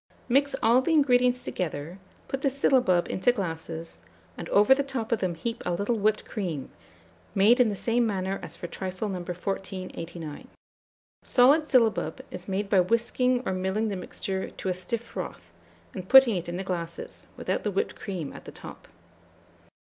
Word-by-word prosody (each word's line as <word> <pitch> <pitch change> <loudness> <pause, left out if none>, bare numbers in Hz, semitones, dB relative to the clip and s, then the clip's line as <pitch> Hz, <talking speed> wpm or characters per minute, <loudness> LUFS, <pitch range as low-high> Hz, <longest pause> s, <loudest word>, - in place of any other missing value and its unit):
Mix 275 +2 +2
all 235 +3 +5
the 325 +5 0
ingredients 250 -4 +4
together, 165 +1 -4 0.3
put 270 - -3
the 275 - +2
syllabub 255 -9 +3
into 190 +7 +2
glasses, 165 - -5 0.3
and 170 - -7
over 210 +5 +6
the 275 - +1
top 265 -5 -4
of 230 - +2
them 180 -3 -1
heap 230 +8 -4
a - - -1
little 205 +6 0
whipped 215 0 +1
cream, 170 -10 -4 0.6
made 215 +6 +5
in 245 -3 +5
the 205 - -2
same 235 +3 +1
manner 195 -2 -2
as - - -9
for - - -7
trifle 185 +4 -4
No. 185 -2 -3
1489. 180 -3 -5 0.8
Solid 285 +5 +4
syllabub 235 -6 +2
is 180 - -8
made 195 +1 -1
by 195 -1 +4
whisking 240 +5 +1
or - - 0
milling 190 +4 -1
the 200 - -2
mixture 190 +1 -4
to 190 - -5
a - - +1
stiff 185 +6 -3
froth, - - -7 0.4
and 185 -1 -7
putting 265 -5 +8
it 175 -1 -3
in 175 - -3
the 190 - -3
glasses, 170 -3 -6
without - - -1
the 210 - 0
whipped 195 - -1
cream 175 -7 -5
at - - -11
the - - -8
top. - - -11
200 Hz, 175 wpm, -27 LUFS, 180-245 Hz, 0.8 s, putting